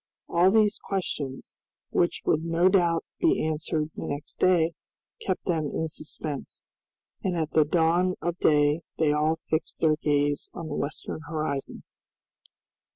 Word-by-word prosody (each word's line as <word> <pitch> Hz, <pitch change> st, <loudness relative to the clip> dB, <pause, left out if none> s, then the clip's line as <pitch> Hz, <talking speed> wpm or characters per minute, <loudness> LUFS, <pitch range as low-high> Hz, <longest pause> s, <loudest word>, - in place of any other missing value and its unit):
All 175 Hz, +2 st, +4 dB
these 210 Hz, 0 st, +3 dB
questions, 145 Hz, -8 st, -4 dB, 0.4 s
which 175 Hz, -, +1 dB
would 155 Hz, -, +2 dB
no 170 Hz, +2 st, +3 dB
doubt 170 Hz, -4 st, +2 dB
be -, -, +2 dB
answered 155 Hz, 0 st, -1 dB
the -, -, -6 dB
next 145 Hz, +1 st, -5 dB
day, 175 Hz, -3 st, +4 dB, 0.5 s
kept 185 Hz, -, -2 dB
them 160 Hz, -4 st, 0 dB
in 160 Hz, +3 st, -2 dB
suspense, 150 Hz, -2 st, -5 dB, 0.6 s
and 180 Hz, -2 st, 0 dB
at 160 Hz, -1 st, -1 dB
the 155 Hz, -1 st, +4 dB
dawn 175 Hz, +3 st, +2 dB
of 175 Hz, 0 st, -2 dB
day 150 Hz, +1 st, +3 dB, 0.2 s
they 155 Hz, -2 st, +3 dB
all 155 Hz, +2 st, +2 dB
fixed 160 Hz, -1 st, -3 dB
their 155 Hz, -2 st, +3 dB
gaze 145 Hz, -1 st, +1 dB
on 170 Hz, -, -5 dB
the 145 Hz, -, -3 dB
western 145 Hz, +2 st, -4 dB
horizon. 155 Hz, -3 st, -3 dB
160 Hz, 145 wpm, -27 LUFS, 150-175 Hz, 0.6 s, All